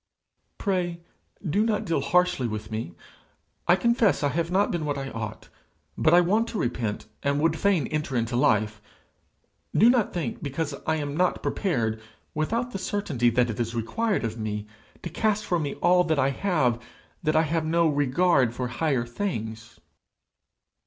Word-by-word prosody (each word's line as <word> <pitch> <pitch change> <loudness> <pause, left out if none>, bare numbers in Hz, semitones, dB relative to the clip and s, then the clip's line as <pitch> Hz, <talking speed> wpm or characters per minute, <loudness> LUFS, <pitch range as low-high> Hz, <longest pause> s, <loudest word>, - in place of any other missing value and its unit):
'Pray, 180 -4 -1 0.5
do 200 +8 +2
not 220 -2 0
deal 165 -5 0
harshly 180 -5 +2
with 110 0 -5
me. 110 -6 -4 0.7
I 175 - +6
confess 235 -4 +2
I 145 - +3
have 165 +3 -1
not 195 +3 +2
been 170 -3 -2
what 145 -1 -2
I 135 -1 -5
ought, 110 -2 -6 0.5
but 155 - +3
I 175 +1 +7
want 210 +6 +2
to 230 - -4
repent, 115 - -2 0.2
and 140 +1 +1
would 160 +1 +2
fain 195 -8 +2
enter 150 -2 -3
into 120 +1 0
life. 110 -5 +2 1.0
Do 230 +4 +7
not 245 -5 +1
think, 155 -10 -4
because 145 +1 -3
I 160 - +2
am 145 -2 -3
not 180 +2 +1
prepared, 115 - -1 0.3
without 230 +11 -1
the 195 - -4
certainty 165 - 0
that 120 0 +2
it 110 - -7
is 115 0 -2
required 200 - -1
of 115 0 -3
me, 105 -1 -3 0.4
to 175 - -4
cast 215 +3 0
from 175 -4 0
me 145 -2 -3
all 180 -1 +3
I 135 0 +3
have 135 - +1 0.4
that 155 -1 0
I 160 - +5
have 160 +1 0
no 170 +1 +3
regard 145 -3 +2
for 125 -1 -3
higher 130 -2 0
things.' 115 - -5
155 Hz, 170 wpm, -26 LUFS, 120-180 Hz, 1.0 s, I